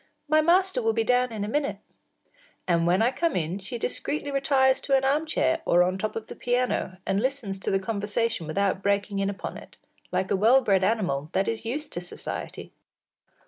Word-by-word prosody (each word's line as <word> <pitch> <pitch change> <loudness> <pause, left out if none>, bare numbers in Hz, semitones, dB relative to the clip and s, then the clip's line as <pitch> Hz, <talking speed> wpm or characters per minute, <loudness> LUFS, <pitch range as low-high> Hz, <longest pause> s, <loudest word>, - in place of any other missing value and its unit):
My 310 +1 +4
master 370 +2 +3
will 225 -1 +1
be 225 0 +1
down 250 +1 +2
in 215 -2 -4
a - - -5
minute.” 285 +5 -1 0.9
And 170 -1 +2
when 185 +5 +3
I 240 - +3
come 335 +4 -1
in 175 +3 -2
she 200 +5 -5
discreetly 285 +4 -3
retires 270 -1 +3
to 275 - +2
an 265 - -1
arm 295 +4 +1
chair 325 0 +1
or 175 +1 +4
on 185 +1 -1
top 215 +2 -3
of 225 - -4
the - - -9
piano, 245 -6 -1
and 195 +1 0
listens 245 -7 -2
to - - -3
the 195 - +2
conversation 205 -2 -2
without 195 +4 0
breaking 200 0 0
in 195 0 0
upon 200 - -6
it, - - -14 0.3
like 185 +1 -1
a - - +4
well 230 +7 +5
bred 195 -5 +2
animal 180 -9 0
that 195 - +1
is 225 0 -3
used 290 +6 -4
to 175 - -3
society. 175 - -7
220 Hz, 205 wpm, -26 LUFS, 190-265 Hz, 0.9 s, well